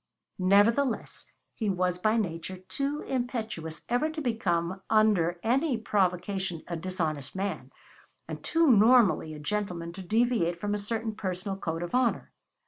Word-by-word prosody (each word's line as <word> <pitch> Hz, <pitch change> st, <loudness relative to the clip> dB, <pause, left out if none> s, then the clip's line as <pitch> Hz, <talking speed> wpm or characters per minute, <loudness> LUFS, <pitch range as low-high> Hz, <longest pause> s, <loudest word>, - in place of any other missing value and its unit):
Nevertheless, 215 Hz, +7 st, +2 dB, 0.3 s
he 215 Hz, -3 st, -2 dB
was 180 Hz, -1 st, 0 dB
by 215 Hz, +4 st, +2 dB
nature 185 Hz, -2 st, -3 dB
too 275 Hz, +10 st, -3 dB
impetuous 220 Hz, -11 st, -4 dB
ever 245 Hz, +6 st, +1 dB
to 315 Hz, 0 st, -5 dB
become 190 Hz, -, -1 dB
under 205 Hz, -6 st, +3 dB
any 265 Hz, +3 st, +2 dB
provocation 190 Hz, -4 st, -1 dB
a 170 Hz, -, -3 dB
dishonest 160 Hz, -5 st, -3 dB
man, 195 Hz, +1 st, -3 dB, 0.6 s
and -, -, -7 dB
too 330 Hz, 0 st, +2 dB
normally 215 Hz, -, +5 dB
a -, -, -9 dB
gentleman 170 Hz, 0 st, -3 dB
to 190 Hz, -, -8 dB
deviate 215 Hz, -4 st, +1 dB
from 205 Hz, +2 st, -2 dB
a 210 Hz, -, -1 dB
certain 220 Hz, +2 st, -3 dB
personal 190 Hz, -1 st, -3 dB
code 165 Hz, -3 st, -3 dB
of 175 Hz, -, -6 dB
honor. 250 Hz, -2 st, +1 dB
200 Hz, 140 wpm, -28 LUFS, 175-230 Hz, 0.6 s, normally